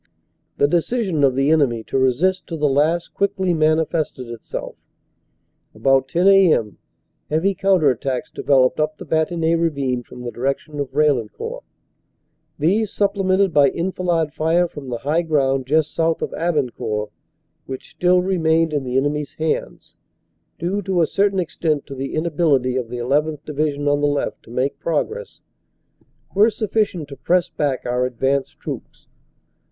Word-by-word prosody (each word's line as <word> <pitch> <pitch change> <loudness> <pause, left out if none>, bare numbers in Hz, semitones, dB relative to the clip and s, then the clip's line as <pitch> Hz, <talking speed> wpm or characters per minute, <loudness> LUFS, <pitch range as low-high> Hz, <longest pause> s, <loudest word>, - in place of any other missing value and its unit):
"The 140 - +4
decision 175 0 0
of 135 -2 +4
the 135 +3 +2
enemy 130 -8 +2
to - - -7
resist 170 +9 +1
to 165 - -5
the 150 -1 +2
last 155 +5 +1
quickly 190 -2 0
manifested 155 -4 0
itself. 120 -2 -6 1.0
About 135 +4 +2
10 175 +7 +1
a.m. 175 - +4 0.5
heavy 165 +6 +1
counter 185 -7 +3
attacks 130 +1 -3
developed 130 -1 +2
up 155 0 0
the - - -9
Bantigny 160 +1 +1
Ravine 140 -7 0
from 125 +1 -11
the 120 - -4
direction 140 +4 -3
of 140 -2 -3
Pail 150 0 +3
lencourt. 110 -3 -6 1.0
These, 200 +7 +1
supplemented 195 -2 +1
by 145 -2 +5
enfilade 170 -3 -1
fire 165 +3 +2
from 145 -5 -9
the 120 - -2
high 150 +7 0
ground 135 -5 0
just 155 +1 +1
south 165 0 0
of - - -3
Abancourt, 125 -10 -2 0.6
which 130 -1 -7
still 180 0 +2
remained 165 -3 +1
in 145 -2 0
the 125 0 -1
enemy 145 +2 +1
s 145 - -9
hands, 160 0 -3 0.6
due 185 +5 -2
to 185 -3 +1
a - - +4
certain 200 +3 +1
extent 160 -4 -1
to - - -8
the 135 0 -5
inability 150 -6 +1
of 125 -3 -2
the 125 - -5
llth. 145 +5 0
Division 145 -1 -1
on 145 0 +2
the 145 - +3
left 145 0 -2
to - - -19
make 130 +4 -2
progress, 440 - -3 0.9
were 210 +4 +5
sufficient 210 -7 -1
to 140 - -8
press 180 +4 +1
back 145 -5 -2
our 125 +1 0
advanced 135 +2 -1
troops. - - -8
155 Hz, 155 wpm, -21 LUFS, 135-175 Hz, 1.0 s, by